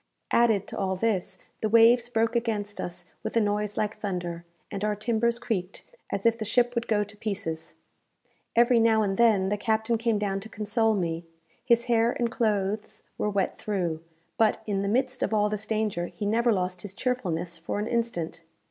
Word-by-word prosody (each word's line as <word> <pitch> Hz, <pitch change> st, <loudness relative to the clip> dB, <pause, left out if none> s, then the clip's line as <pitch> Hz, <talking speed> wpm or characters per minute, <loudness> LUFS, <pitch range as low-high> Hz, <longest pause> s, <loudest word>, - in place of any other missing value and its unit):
Added 225 Hz, -4 st, +4 dB
to -, -, -5 dB
all 190 Hz, -1 st, 0 dB
this, 190 Hz, -2 st, -1 dB, 0.2 s
the 215 Hz, -, +1 dB
waves 230 Hz, +2 st, +6 dB
broke 230 Hz, 0 st, +1 dB
against 215 Hz, -3 st, -1 dB
us 175 Hz, 0 st, -5 dB, 0.2 s
with -, -, -2 dB
a -, -, +7 dB
noise 210 Hz, -1 st, 0 dB
like 210 Hz, 0 st, -1 dB
thunder, 175 Hz, -5 st, -4 dB, 0.3 s
and 200 Hz, -, -4 dB
our 210 Hz, 0 st, +1 dB
timbers 235 Hz, +2 st, +1 dB
creaked 200 Hz, -6 st, -3 dB, 0.3 s
as -, -, -2 dB
if 230 Hz, 0 st, +3 dB
the -, -, -1 dB
ship 245 Hz, +3 st, +2 dB
would 235 Hz, -1 st, -2 dB
go 210 Hz, -2 st, +2 dB
to 210 Hz, +1 st, -10 dB
pieces. 195 Hz, -7 st, -4 dB, 0.8 s
Every 235 Hz, 0 st, +5 dB
now 225 Hz, -1 st, +4 dB
and 195 Hz, -2 st, 0 dB
then, 210 Hz, -4 st, +4 dB
the 205 Hz, -, 0 dB
captain 220 Hz, +2 st, 0 dB
came 230 Hz, -2 st, +1 dB
down 200 Hz, -1 st, -1 dB
to 220 Hz, +3 st, -10 dB
console 220 Hz, +1 st, +1 dB
me. 170 Hz, -3 st, -2 dB, 0.4 s
His 235 Hz, -1 st, +3 dB
hair 235 Hz, -1 st, +3 dB
and 235 Hz, -1 st, -1 dB
clothes 215 Hz, -1 st, -1 dB, 0.2 s
were 210 Hz, -, +1 dB
wet 200 Hz, -2 st, -1 dB
through; 175 Hz, -6 st, -2 dB, 0.4 s
but, 220 Hz, -1 st, +3 dB
in 200 Hz, -2 st, -1 dB
the 200 Hz, -, -1 dB
midst 255 Hz, +4 st, 0 dB
of 220 Hz, -, +1 dB
all 210 Hz, 0 st, +3 dB
this 210 Hz, 0 st, -4 dB
danger, 215 Hz, -6 st, -1 dB
he 210 Hz, -, -6 dB
never 230 Hz, +3 st, +3 dB
lost 180 Hz, -3 st, -1 dB
his 200 Hz, 0 st, -8 dB
cheerfulness 175 Hz, -10 st, -2 dB
for 165 Hz, -, -3 dB
an 210 Hz, -, -1 dB
instant. 220 Hz, -9 st, -2 dB
215 Hz, 195 wpm, -27 LUFS, 195-230 Hz, 0.8 s, a